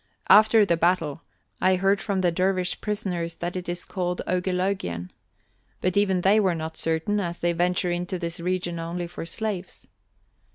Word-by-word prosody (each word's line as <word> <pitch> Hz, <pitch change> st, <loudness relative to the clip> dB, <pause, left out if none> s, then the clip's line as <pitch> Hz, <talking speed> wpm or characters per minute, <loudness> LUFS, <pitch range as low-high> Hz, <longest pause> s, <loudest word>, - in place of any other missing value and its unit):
After 215 Hz, 0 st, +7 dB
the 170 Hz, -4 st, +2 dB
battle, 165 Hz, -3 st, +1 dB, 0.4 s
I 185 Hz, 0 st, +4 dB
heard 195 Hz, +2 st, +2 dB
from 200 Hz, -3 st, -1 dB
the 175 Hz, -2 st, +2 dB
dervish 185 Hz, +1 st, 0 dB
prisoners 180 Hz, -5 st, -2 dB
that 175 Hz, +1 st, -4 dB
it 180 Hz, -1 st, -4 dB
is 175 Hz, 0 st, -3 dB
called 180 Hz, -2 st, -3 dB
Ogeloguen, 180 Hz, -, -1 dB, 0.7 s
but 185 Hz, -1 st, 0 dB
even 195 Hz, -3 st, +2 dB
they 200 Hz, +4 st, +5 dB
were 190 Hz, -4 st, +2 dB
not 160 Hz, 0 st, -5 dB
certain, 165 Hz, +6 st, 0 dB
as 175 Hz, -3 st, -3 dB
they 175 Hz, 0 st, 0 dB
venture 180 Hz, +1 st, +1 dB
into 180 Hz, +2 st, -2 dB
this 170 Hz, 0 st, -3 dB
region 175 Hz, -1 st, -2 dB
only 170 Hz, +1 st, -3 dB
for 170 Hz, -1 st, -7 dB
slaves. 195 Hz, 0 st, -4 dB
180 Hz, 165 wpm, -25 LUFS, 170-190 Hz, 0.7 s, After